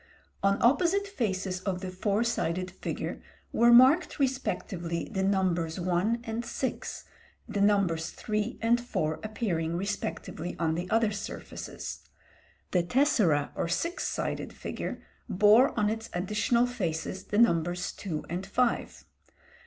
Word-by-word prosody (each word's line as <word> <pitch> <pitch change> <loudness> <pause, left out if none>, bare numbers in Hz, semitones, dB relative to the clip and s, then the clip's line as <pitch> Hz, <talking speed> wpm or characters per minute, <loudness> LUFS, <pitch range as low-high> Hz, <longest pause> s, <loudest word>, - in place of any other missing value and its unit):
On 200 0 +2
opposite 345 +11 +3
faces 190 - -2
of 185 -2 -2
the 185 -1 -4
four 200 +4 0
sided 185 -6 -1
figure 190 - -5 0.3
were 235 +1 +5
marked 260 +8 +6
respectively 195 - -2
the 190 - -1
numbers 185 -4 +1
one 185 +6 +1
and 225 +1 -3
six, 260 +2 -4 0.4
the 210 -3 -2
numbers 195 -6 +2
three 215 +3 -3
and 235 +1 +3
four 155 -10 -2
appearing 175 -7 -1
respectively 180 -3 -4
on 160 -2 +1
the 175 +2 -3
other 225 -1 +3
surfaces. 205 0 -6 0.7
The 180 - +3
tessera, 180 - +2
or - - -2
six 335 - -1
sided - - -3
figure, - - -5 0.3
bore 210 +7 +6
on 210 - +3
its 225 +1 -3
additional 210 +6 +2
faces 185 -6 -3
the 205 - -2
numbers 175 -5 +2
two 160 -6 -5
and 175 +3 -3
five. 235 +5 -1
200 Hz, 130 wpm, -29 LUFS, 175-235 Hz, 0.7 s, marked